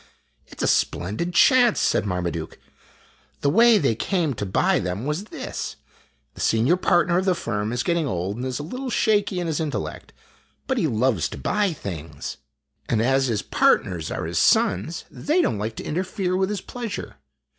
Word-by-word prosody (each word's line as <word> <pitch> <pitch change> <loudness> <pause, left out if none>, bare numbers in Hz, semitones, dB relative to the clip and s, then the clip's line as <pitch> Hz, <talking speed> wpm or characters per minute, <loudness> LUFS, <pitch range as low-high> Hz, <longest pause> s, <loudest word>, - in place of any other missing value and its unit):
"It - - -15
's - - -1
a - - +2
splendid 105 - 0
chance!" 250 -4 +5
said - - +1
Marmaduke. 85 -3 -3 0.8
"The 140 - +2
way 230 +4 +6
they 135 - +2
came 165 - 0
to 105 -3 -4
buy 95 - +2
them 90 +6 -3
was 150 +7 -2
this: - - -6 0.6
the - - -9
senior 115 +10 +3
partner 175 -1 +2
of 190 - -2
the 185 -2 +3
firm 105 -8 -2
is 120 0 -1
getting 170 -3 0
old 95 -1 -2
and 125 - -4
is 130 -1 -2
a 145 - -5
little 255 - -5
shaky 205 -5 +1
in 175 - -2
his 160 -3 -1
intellect, 155 -3 -4 0.5
but 265 -2 0
he 165 - +2
loves 115 - +1
to - - -8
buy 210 -2 0
things; 80 - -7 0.5
and 115 - +2
as 135 +3 +2
his 110 -4 -1
partners 85 -5 +1
are - - -3
his - - -1
sons, 105 - +2
they 315 +5 0
don't 110 - +1
like 110 +2 -3
to - - -6
interfere 185 +2 -2
with 190 +1 +1
his 210 - -2
16 245 - -10
IMAGINOTIONS 230 -4 -3
pleasure. - - -12
150 Hz, 190 wpm, -23 LUFS, -, 0.8 s, way